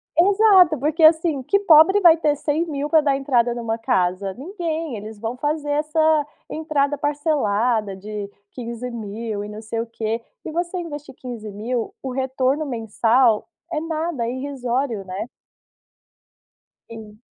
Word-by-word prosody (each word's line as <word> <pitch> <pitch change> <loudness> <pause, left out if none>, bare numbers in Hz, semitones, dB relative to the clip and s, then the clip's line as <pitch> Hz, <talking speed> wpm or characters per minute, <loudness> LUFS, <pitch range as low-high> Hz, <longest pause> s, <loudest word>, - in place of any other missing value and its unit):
Exato, 380 -3 +5
porque 305 +5 -1
assim, 320 -2 +5
que 400 +10 +2
pobre 365 +2 +6
vai 340 -4 +7
ter 300 -2 +1
100.000 295 -1 -2
pra 315 0 +4
dar 280 -2 +1
entrada 245 -3 +1
numa 230 -1 -3
casa? 195 -5 0
Ninguém, 325 - -4
eles 215 +1 -8
vão 225 +3 -4
fazer 295 +2 -2
essa 305 0 +2 0.2
entrada 300 -2 0
parcelada 250 - 0
de 205 +1 -6 0.2
15.000, 230 -3 -5
e 205 - -7
não 210 0 -8
sei 225 +1 -4
o 230 - -6
quê. 225 0 -3 0.2
E - - -4
você 345 +3 -2
investir 295 -6 -7
15.000,, 230 -1 -5
o 265 - -3
retorno 265 +2 0
mensal 230 -1 +2 0.2
é 310 - -1
nada, 320 -6 -2
irrisório, 255 -3 -2
né. 190 +4 -5 1.6
Sim. 215 -2 -11
265 Hz, 135 wpm, -22 LUFS, 225-310 Hz, 1.6 s, vai